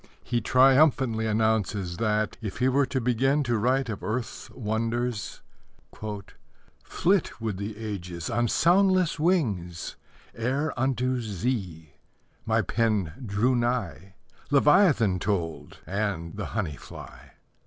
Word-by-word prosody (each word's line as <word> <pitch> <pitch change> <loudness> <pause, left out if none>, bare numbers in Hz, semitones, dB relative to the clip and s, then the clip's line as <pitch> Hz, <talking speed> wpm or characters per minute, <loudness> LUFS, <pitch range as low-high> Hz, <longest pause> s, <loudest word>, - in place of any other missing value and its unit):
He 120 0 -1
triumphantly 130 -2 +4
announces 105 -4 0
that, 110 -1 0
if 105 -4 -5
he 125 - +2
were 135 +1 +3
to 130 - -1
begin 130 +4 +2
to 120 -3 0
write 125 +4 +1
of 110 -4 -5
earth's 115 +2 -4
wonders: 115 0 -3 0.5
Flit 110 - -3
would 110 -4 -3
the 100 +2 -5
ages 90 -7 -5
On 120 0 +1
soundless 185 - +3
wings 105 - 0 0.4
Ere 135 +6 -1
unto 130 0 0
Z 95 - -3 0.5
My - - +2
pen 105 -7 0
drew 115 +4 +1
nigh; 120 -6 -2 0.3
Leviathan 140 - +4
told, 85 -5 -3
And 100 -4 -3
the 105 - -4
honey 80 -9 -2
fly. - - -12
115 Hz, 115 wpm, -26 LUFS, 100-130 Hz, 0.5 s, triumphantly